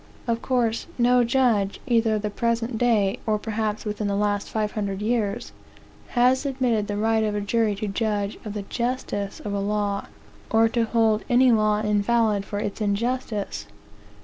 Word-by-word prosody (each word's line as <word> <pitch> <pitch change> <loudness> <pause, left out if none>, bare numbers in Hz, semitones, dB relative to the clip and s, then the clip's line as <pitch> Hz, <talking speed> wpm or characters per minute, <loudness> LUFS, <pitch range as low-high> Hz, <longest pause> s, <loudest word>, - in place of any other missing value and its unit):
Of 230 -1 -1
course, 235 -3 0
no 245 0 +4
judge, 235 -5 +1
either 230 -3 +2
of 210 - -3
the 210 - -2
present 230 +1 -1
day, 225 -2 +2
or 215 -1 +2
perhaps 215 0 -3
within 210 0 -2
the 200 - 0
last 205 0 0
five 215 -1 -1
hundred 200 -2 -3
years, 220 0 -1 0.7
has 255 +2 +4
admitted 250 -6 0
the 205 - -3
right 220 +1 +2
of 210 -1 -1
a - - 0
jury 215 0 +1
to 210 +2 -4
judge 205 0 -1
of 210 - -6
the 205 -1 -4
justice 235 -3 -3
of 205 - -4
a 200 - -1
law, 205 0 -1 0.4
or 225 0 +4
to 230 0 +1
hold 220 -1 +2
any 250 +1 +5
law 215 -1 +3
invalid 210 0 +1
for 205 - -5
its 205 +1 -4
injustice. 210 - -2
215 Hz, 175 wpm, -24 LUFS, 205-235 Hz, 0.7 s, any